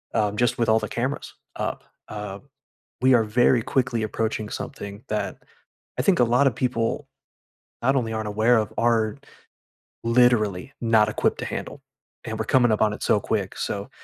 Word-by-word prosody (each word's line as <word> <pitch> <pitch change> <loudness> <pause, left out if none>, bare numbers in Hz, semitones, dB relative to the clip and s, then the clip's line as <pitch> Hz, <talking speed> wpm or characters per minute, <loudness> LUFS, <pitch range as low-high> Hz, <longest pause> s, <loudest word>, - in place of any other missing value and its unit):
Um, 105 -2 +1
just 120 0 +2
with 115 - +1
all 110 0 +4
the 105 - -4
cameras 130 +4 -3 0.2
up, - - -3 0.3
uh, 105 -2 -6 0.6
we 130 0 +5
are, 115 -2 +5
very 120 +2 +3
quickly, 125 -2 0
approaching 110 0 -2
something 100 +2 -7
that, 105 -3 -3 0.6
I - - +4
think 190 -3 +3
a 125 - +6
lotta 125 +3 +3
people, 125 +3 -1 0.7
not 135 +3 +2
only 115 -3 -1
aren't 110 -1 -3
aware 110 +3 +3
of 110 -2 -1
are, 115 0 +2 0.9
literally 115 -2 +2
not 110 -2 +4
equipped - - 0
to - - -3
handle, 140 - -6 0.4
and 110 -1 -4
we're 110 - -1
coming 120 -2 +4
up - - -1
on 105 -1 +4
it - - -8
so - - +3
quick, - - -2
so, - - -3
115 Hz, 170 wpm, -24 LUFS, 105-125 Hz, 0.9 s, a